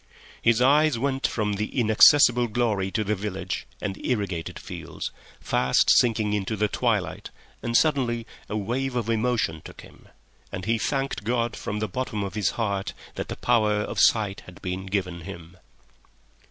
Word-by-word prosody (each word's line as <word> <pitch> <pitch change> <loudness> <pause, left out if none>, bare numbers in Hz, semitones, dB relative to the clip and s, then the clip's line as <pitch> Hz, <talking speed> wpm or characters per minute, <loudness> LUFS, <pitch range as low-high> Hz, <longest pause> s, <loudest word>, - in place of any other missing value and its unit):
His 115 +1 +3
eyes 150 0 +4
went 135 +2 0
from 105 -2 -1
that 105 +1 -1
inaccessible 120 +1 +5
glory 105 -4 0
to 110 +3 -1
the 105 +1 0
village 95 -2 -4
and 100 -2 -5
irrigated 100 -9 -2
fields, - - -7 0.3
fast 65 - +2
sinking 110 -3 +3
into 105 +1 -1
the 105 0 +1
twilight, 105 -7 -1 0.3
and 120 0 +2
suddenly 125 -7 +1 0.2
a 110 - -2
wave 125 +5 -2
of 115 -2 -1
emotion 110 -8 0
took - - -11
him, - - -17 0.4
and 95 -2 -5
he 115 +1 +1
thanked 135 -2 -2
God 120 +1 0
from 105 - -4
the 110 0 -1
bottom 110 0 -3
of 100 -2 -5
his 105 -3 +1
heart 100 -4 -1 0.2
that - - -5
the - - -5
power 110 -3 +2
of - - -4
sight 105 -3 +3
had 90 - -12
been 95 +1 -4
given 90 -3 -2
him. 85 -1 -10
110 Hz, 165 wpm, -25 LUFS, 95-120 Hz, 0.4 s, inaccessible